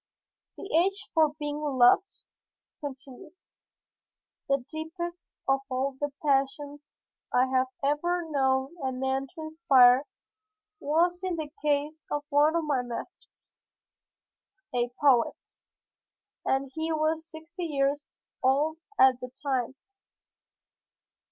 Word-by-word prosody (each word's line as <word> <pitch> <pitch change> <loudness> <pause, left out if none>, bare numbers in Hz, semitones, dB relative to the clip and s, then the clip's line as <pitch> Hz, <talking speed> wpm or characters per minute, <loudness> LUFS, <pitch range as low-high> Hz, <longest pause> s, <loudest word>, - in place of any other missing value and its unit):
"The - - -7
age 390 +4 +1
for 310 -2 +3
being 295 -1 -4
loved?" 275 +5 +3 0.4
he 290 - -8
continued. 275 +5 -12 1.2
"The 275 -2 +1
deepest 345 +2 -6 0.2
of 270 0 +3
all 265 +1 -1
the 290 0 -1
passions 285 +1 -1 0.3
I 250 - +4
have 260 0 +1 0.2
ever 345 +5 0
known 265 0 +1
a 260 - 0
man 265 +1 -1
to 320 - -7
inspire 275 -5 +5 0.7
was 345 +4 +1
in 370 -2 -1
the 310 -3 -5
case 300 +1 0
of 295 0 -2
one 295 +3 +4
of 335 - +1
my 285 -4 +1
masters, 240 -1 -7 1.5
a 245 0 +1
poet, 265 -5 +4 1.1
and 270 0 0
he 320 +2 -2
was 315 +1 0
sixty 330 +3 -7
years 285 -1 -1 0.3
old 290 +5 +2 0.2
at 260 -1 +6
the 250 - -7
time. 260 -2 -1
290 Hz, 115 wpm, -28 LUFS, 265-315 Hz, 1.5 s, at